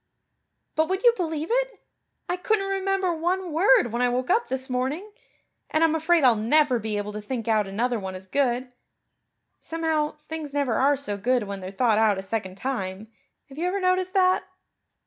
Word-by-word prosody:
But 315 +1 +1
would 380 +3 -1
you 480 -1 +7
believe 320 -4 -3
it? - - 0 0.5
I 355 - 0
couldn't 390 +2 0
remember 390 -2 0
one 350 +2 -1
word 285 - +4
when 235 +2 -1
I 250 - +3
woke 250 +6 -1
up 465 +5 +2
this 260 0 -3
morning. 270 +11 -2 0.6
And 310 - +2
I'm 325 -1 +4
afraid 320 0 +2
I'll 250 -3 +6
never 250 +4 +3
be 215 -1 -3
able 205 0 -4
to 210 - -5
think 230 +1 -5
out 215 -3 +2
another 235 +4 -1
one 190 -1 -6
as 185 0 -9
good. 250 +2 0 0.9
Somehow, 320 -2 -1
things 310 -3 -6
never 280 -5 +1
are 275 +6 +3
so 260 -7 -4
good 245 +3 +1
when 200 -1 -5
they're 185 0 -6
thought 215 +2 +2
out 215 -3 +3
a 190 - -4
second 190 -2 -4
time. 215 -4 -4 0.4
Have 275 +2 -10
you 350 - 0
ever 390 +2 -1
noticed 370 0 0
that?" 370 -1 +3
270 Hz, 190 wpm, -25 LUFS, 225-345 Hz, 0.9 s, you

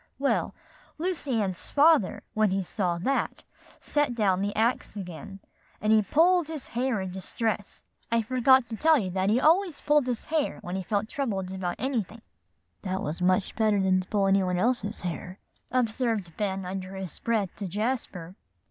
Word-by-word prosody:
"Well, 275 +1 0 0.4
Lucy 310 -8 -1
Ann's 185 -3 -4
father, 295 - +4
when 215 -1 +3
he 190 +1 0
saw 180 -1 -1
that, 265 +11 -1 0.4
set 290 -4 0
down 195 -4 +2
the 205 +1 -2
axe 225 -1 0
again, 195 +2 -8 0.4
and 215 +1 +2
he 220 - +6
pulled 335 - +3
his 315 -4 -7
hair 245 -2 0
in 190 -1 -4
distress. 205 +3 -3 0.3
I 230 -1 +2
forgot 255 +1 +4
to 225 - -4
tell 315 +6 +4
you 190 -8 -2
that 190 +1 0
he 225 +4 +3
always 335 +3 +3
pulled 295 -3 +3
his 245 -3 -2
hair 310 -2 0
when 180 -1 -4
he 190 - -2
felt 205 +3 -1
troubled 195 -9 -3
about 180 -2 -3
anything" 230 -4 -3 0.6
"That 190 0 -3
was 155 +4 -4
much 185 +2 +2
better 215 -2 +2
than 190 -1 +3
to 185 - -12
pull 200 -2 +1
any 195 0 +4
one 180 -1 0
else's 225 0 0
hair," 180 +1 -5 0.3
observed 230 -7 0
Ben 195 -2 -2
under 190 +1 -5
his 190 -3 -6
breath 215 -5 -1
to 200 - -4
Jasper. 200 -4 -3
210 Hz, 175 wpm, -27 LUFS, 190-255 Hz, 0.6 s, he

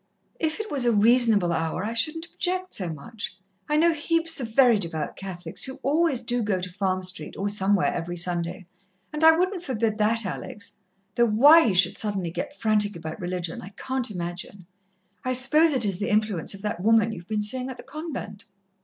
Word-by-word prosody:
"If 315 +2 -1
it 435 -1 -5
was 275 -3 0
a 240 - +3
reasonable 220 -4 +4
hour 165 +4 -2
I 225 - -3
shouldn't 310 +8 +1
object 370 +2 -2
so 180 -4 -1
much 185 +5 -7 0.3
I 300 - +2
know 335 +2 +4
heaps 330 +1 +1
of 225 -2 -6
very 245 -5 +5
devout 165 -5 -4
Catholics 175 -3 -5
who 265 -1 -6
always 285 -1 +2
do 245 0 -1
go 205 -4 0
to 180 0 -6
Farm 185 -1 -1
Street 180 -4 -4
or 200 - -2
somewhere 200 -1 +1
every 175 +1 -4
Sunday, 175 +1 0 0.5
and 300 +1 -1
I 320 0 +7
wouldn't 370 +1 0
forbid 225 -8 -2
that, 225 +1 +2
Alex 200 +2 -5 0.4
though 240 0 +3
why 290 +10 +7
you 205 -5 +1
should 180 0 +2
suddenly 195 -5 -2
get 290 - -6
frantic 210 -2 +2
about 160 0 -7
religion 175 -1 -4
I 190 - -9
can't 260 -2 -2
imagine. 180 0 -6 0.6
I 255 - -1
suppose 300 +6 +4
it 255 -5 +1
is 195 -3 -2
the 205 - -2
influence 210 -5 0
of 195 - -13
that 210 -4 -3
woman 225 +1 +3
you 215 - -6
have 175 - -16
been 210 -1 -1
seein' 255 +5 -3
at 260 - -7
the - - -11
convent." 270 -9 -7
215 Hz, 200 wpm, -25 LUFS, 185-265 Hz, 0.6 s, I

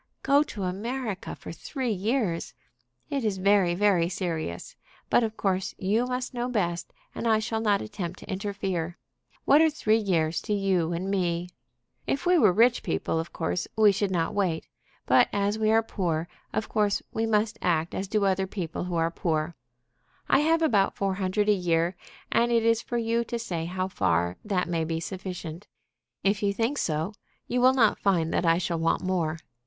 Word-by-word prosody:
"Go 280 +1 +5
to 220 -9 -4
America 210 +3 -3
for - - -9
three 260 -5 -3
years! 205 -3 -1 0.6
It 275 -3 -1
is 210 -3 0
very, 190 -2 +3
very 180 -3 +3
serious. 165 - -4 0.4
But - - +5
of 220 -1 -3
course 190 0 -1
you 215 +6 +1
must 250 0 -3
know 245 0 -2
best, 175 -7 -1 0.2
and 235 - -3
I 220 -1 +4
shall 220 +1 -2
not 205 -3 +2
attempt 185 -4 -5
to - - -13
interfere. 190 -4 -3 0.5
What 290 +3 +6
are 320 - +5
three 225 -7 +2
years 170 -6 0
to 210 - -2
you 190 -4 +1
and 180 +3 -2
me? 175 -2 0 0.6
If 275 +5 -1
we 355 -1 +5
were 210 -8 +6
rich 235 +6 +4
people, 80 - -1
of 165 - -5
course 85 +2 -2
we 215 -2 +6
should 200 0 0
not 175 0 0
wait; 185 -6 0 0.4
but - - +5
as 205 +1 0
we 215 0 +2
are 225 +1 +4
poor, 170 -7 -2 0.2
of 215 - -2
course 210 -2 +1
we 225 0 0
must 215 0 +1
act 165 -1 +1
as 195 - -3
do 205 0 +1
other 190 0 +1
people 180 -3 -4
who 180 -1 -3
are 165 0 +1
poor. 160 -1 -1 0.7
I - - +4
have 325 +2 +3
about 205 -11 +3
four 195 -1 0
hundred 190 +2 0
a 210 - +6
year; 175 -1 +1 0.4
and 240 +1 +3
it 230 -1 +3
is 230 0 +3
for 240 - -3
you 230 0 +1
to 235 - -3
say 175 -8 -3
how 185 +2 -2
far 85 - 0
that 195 -4 0
may 165 -2 0
be 160 0 -2
sufficient. 180 0 -6 0.6
If 200 +1 +2
you 200 -1 +1
think 235 +7 -1
so, 160 +5 -1 0.3
you 250 0 0
will 260 +1 +6
not 225 -5 +3
find 170 -5 +1
that 175 - +1
I 165 0 +5
shall 175 -2 -1
want 165 - +1
more. 170 -4 0
195 Hz, 190 wpm, -27 LUFS, 175-220 Hz, 0.7 s, What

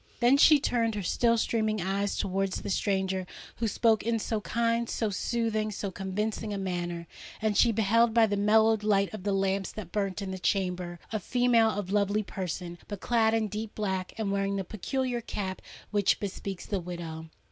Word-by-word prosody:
Then 245 +3 +5
she 300 +1 +7
turned 230 -4 0
her 205 - -3
still 235 +5 +2
streaming 220 -1 0
eyes 195 +2 -1
towards 195 0 -1
the - - -3
stranger 190 -1 0 0.3
who 230 - 0
spoke 220 +1 +3
in 230 0 0
so 220 0 -2
kind, 230 +4 0
so 220 -3 -1
soothing, 215 +1 -1
so 200 -1 -4
convincing 210 +3 -3
a 205 - -2
manner; 175 -3 -3 0.3
and 215 -1 0
she 235 +3 +5
beheld, 225 +2 +3
by 230 0 +5
the 205 -2 -1
mellowed 220 +2 +4
light 200 -2 +2
of 215 - -6
the 200 +2 -1
lamps 195 -1 0
that 190 -6 -8
burnt 195 -2 -1
in 195 -2 -4
the 190 - -5
chamber, 180 -1 -1 0.2
a 215 - 0
female 240 +1 +3
of 205 -3 -3
lovely 205 +1 +2
person, 175 -3 -5
but 205 -2 -6
clad 225 0 +2
in 220 -1 +1
deep 210 +2 -5
black, 190 -3 -2
and 215 -3 -1
wearing 200 0 0
the 195 - -1
peculiar 245 +5 -2
cap 190 -4 -4 0.3
which 205 -2 +2
bespeaks 195 -1 -5
the 200 - -1
widow. 165 -2 -7
205 Hz, 190 wpm, -29 LUFS, 190-225 Hz, 0.3 s, she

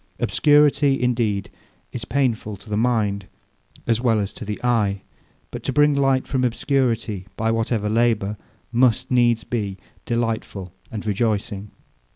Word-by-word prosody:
Obscurity, 145 -2 +4
indeed, 115 -5 0 0.4
is 115 -2 -5
painful 115 -7 -1
to 105 - -14
the - - +1
mind 105 -4 0 0.6
as 115 0 +1
well 115 -3 +3
as 100 -2 -2
to - - -8
the 105 -1 -4
eye; 105 -5 +1 0.5
but - - -6
to - - -2
bring 145 +2 +4
light 135 -2 +2
from 130 -2 -1
obscurity, 115 -6 0
by 110 0 +1
whatever 115 -1 0
labour, 110 -2 +1 0.4
must 125 +2 +2
needs 120 -2 +3
be 100 -5 -3 0.3
delightful 115 -6 -2 0.2
and 110 -2 -5
rejoicing. 105 -1 -1
115 Hz, 140 wpm, -22 LUFS, 105-125 Hz, 0.6 s, Obscurity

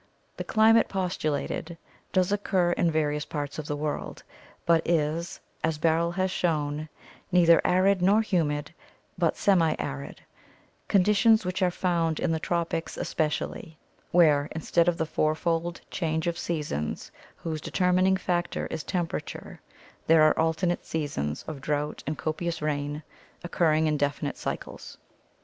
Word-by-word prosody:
The - - -3
climate 225 +1 +4
postulated 170 -3 -2 0.3
does 185 0 +2
occur 190 -3 +1
in 175 -1 +2
various 150 -2 0
parts 145 -1 -5
of 155 - -6
the 145 - -2
world, 150 0 -4 0.4
but 165 -1 +4
is, 165 0 -1 0.2
as 160 -1 0
Barrell 165 +2 +2
has 185 0 0
shown, 155 -3 -1 0.4
neither 170 -2 +6
arid 185 +1 +3
nor 200 +4 +4
humid, 155 -6 -1 0.5
but 170 -3 +2
semiarid 160 - 0 0.3
— - - -34
conditions 210 +2 +4
which 185 +2 -2
are 185 - +4
found 170 -3 0
in 175 - 0
the 160 - 0
tropics 170 0 -2
especially, 155 0 -3 0.3
where 150 -4 +4
instead 165 +1 +1
of 175 -1 +2
the 160 - 0
fourfold 165 +2 -1
change 160 -1 -1
of 170 -1 0
seasons 150 - -3 0.2
whose 160 -2 -5
determining 185 +2 +2
factor 175 -2 -1
is - - -3
temperature 175 0 -4 0.5
there 160 -1 +6
are 155 - +4
alternate 165 +2 0
seasons 140 - -3
of 150 -4 -6
drought 150 0 -2
and 155 0 -2
copious 165 +3 -3
rain, 150 0 -2 0.4
occurring 160 -2 +2
in 155 -1 +1
definite 145 0 -1
cycles. - - -6
165 Hz, 135 wpm, -27 LUFS, 150-180 Hz, 0.5 s, neither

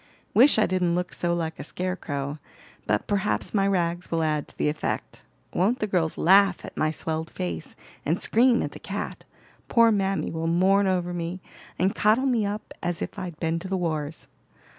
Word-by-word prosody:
"Wish 260 +4 +6
I 215 - +5
didn't 180 -2 +1
look 180 0 -2
so 175 - -1
like 165 -1 -3
a - - -4
scare 185 0 -3
crow; 145 -3 -4 0.5
but 105 - +1
perhaps 205 0 -1
my 200 -2 +3
rags 175 -2 0
will 165 -1 0
add 150 -2 0
to - - -16
the - - +1
effect. 150 +1 -3 0.3
Won't 210 +8 +2
the 215 - -1
girls 175 -6 0
laugh 195 0 +5
at - - -10
my 155 - +1
swelled 160 +1 -3
face, 85 -3 -5 0.3
and 165 +5 0
scream 240 +1 +4
at - - -4
the - - -10
cat. - - -5 0.4
Poor 230 -1 +5
mammy 195 -2 0
will 165 0 -2
mourn 190 +4 +3
over 180 -1 0
me 175 +1 -4 0.4
and 190 +2 +2
coddle 220 +6 +3
me 235 -6 +2
up 205 +1 -5
as 175 -1 -1
if - - -6
I'd 175 -4 -6
been 165 0 0
to 185 - -7
the 190 0 -1
wars. 155 -3 -3
180 Hz, 195 wpm, -26 LUFS, 160-200 Hz, 0.5 s, Wish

